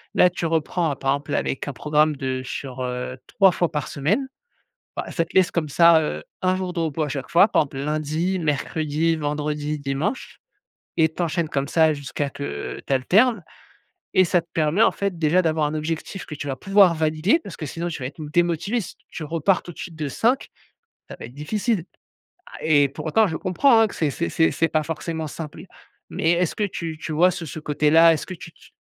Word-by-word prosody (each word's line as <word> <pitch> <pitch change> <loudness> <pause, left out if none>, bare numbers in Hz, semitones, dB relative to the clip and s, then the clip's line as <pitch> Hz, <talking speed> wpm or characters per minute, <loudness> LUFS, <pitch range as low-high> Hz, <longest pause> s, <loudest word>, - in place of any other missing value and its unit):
là, 180 - +6
tu 180 -1 -4
reprends 165 -1 0
par 135 -1 0
exemple, 140 +1 -2
là, - - +1
avec 135 - -2
un 145 - -3
programme 150 +4 +2
de 130 -1 -2
sur, 130 0 -6
heu, 125 0 -4
3 195 -2 +4
fois 175 -1 0
par 150 -1 -2
semaine. 185 - 0 0.7
Bah, - - -4
ça 165 - 0
te 165 - -18
laisse 190 0 +4
comme 165 -3 -1
ça, 170 +3 +6
heu, 75 - -3 0.2
1 185 0 +2
jour 185 -1 -3
de 175 - -4
repos 160 -1 -1
à 150 - -3
chaque 135 -1 -5
fois, 180 +5 +5
par - - +3
exemple 135 -2 -8
lundi, 155 +5 -1
mercredi 155 +1 -1
et 165 - +3
vendredi, 150 0 -2
dimanche 140 - -3 0.6
et 160 -1 +5
tu 175 - -3
enchaînes 170 -1 -1
comme 140 -2 -2
ça 160 -1 +3
jusqu'à 145 0 -3
que 140 +1 -5
tu - - -3
alternes 200 - +3 0.7
et 185 - +6
ça 175 +1 +3
te - - -33
permet, 160 +6 +2
en - - +5
fait, 200 -3 -3
déjà 165 +3 +3
d'avoir 155 -2 +1
un 150 - -3
objectif 160 +5 -4
que - - -7
tu 145 - -6
vas 135 - -2
pouvoir 195 -1 +4
valider 155 - +2
parce - - -9
que 160 - -6
sinon 170 +4 -4
tu 160 - -6
vas - - -2
être 140 +3 -9
m 150 - -6
démotivé. 175 +7 +1
Si 190 - -8
t - - -35
tu 160 - -7
repars 165 +4 +1
tout 175 - -9
de - - -19
suite 165 -3 -7
de 155 -2 -3
5, 240 - +1 0.6
ça - - -9
va - - -9
être 120 - -13
difficile. 195 - -1 0.6
A - - -11
et 145 -3 +4
pour 140 - -8
autant, 215 +8 +4
je 160 -4 -3
comprends, 225 - +3
hein, 225 - +5
que - - -10
c'est 155 -3 0
c'est 170 +5 -2
c'est 160 -1 +3
c'est 165 - +1
pas 155 -1 +1
forcément 160 0 -4
simple. 155 +1 -8 0.5
Mais 165 - 0
est-ce 175 -1 +1
que 210 - -1
tu 165 -5 -4
tu 155 - -5
vois 175 +4 +4
ce 175 -1 -6
ce 155 - -7
côté-là? 155 +2 +4
Est-ce 155 - -3
que 185 - -6
tu 165 -1 -11
tu - - -20
160 Hz, 230 wpm, -23 LUFS, 150-175 Hz, 0.7 s, là